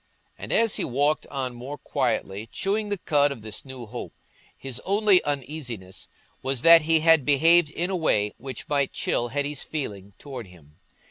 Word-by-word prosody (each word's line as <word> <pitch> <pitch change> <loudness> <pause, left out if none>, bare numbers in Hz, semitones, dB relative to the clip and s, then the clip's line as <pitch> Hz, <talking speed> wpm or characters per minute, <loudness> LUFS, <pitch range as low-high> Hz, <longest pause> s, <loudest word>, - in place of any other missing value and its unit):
And - - -8
as 230 -2 +3
he - - -1
walked 145 +4 0
on 130 -3 -4
more 130 +5 -7
quietly, 115 -7 -2
chewing 205 +2 -1
the 205 - -1
cud 145 -5 +2
of 115 -6 -8
this 110 -1 -5
new 130 -3 -9
hope, 120 +3 -8 0.4
his 135 -3 -5
only 200 -1 +4
uneasiness 130 -9 -5 0.3
was 130 -2 -2
that 165 0 +9
he 160 +1 +3
had 160 -2 +5
behaved 160 +4 +5
in 175 +4 -3
a - - 0
way 105 - +1
which 130 -2 -7
might 140 -2 0
chill 120 - -1
Hetty's 145 +2 -2
feeling 100 -10 -5
towards 130 -8 -8
him. 75 -4 -19
140 Hz, 175 wpm, -25 LUFS, 120-160 Hz, 0.4 s, that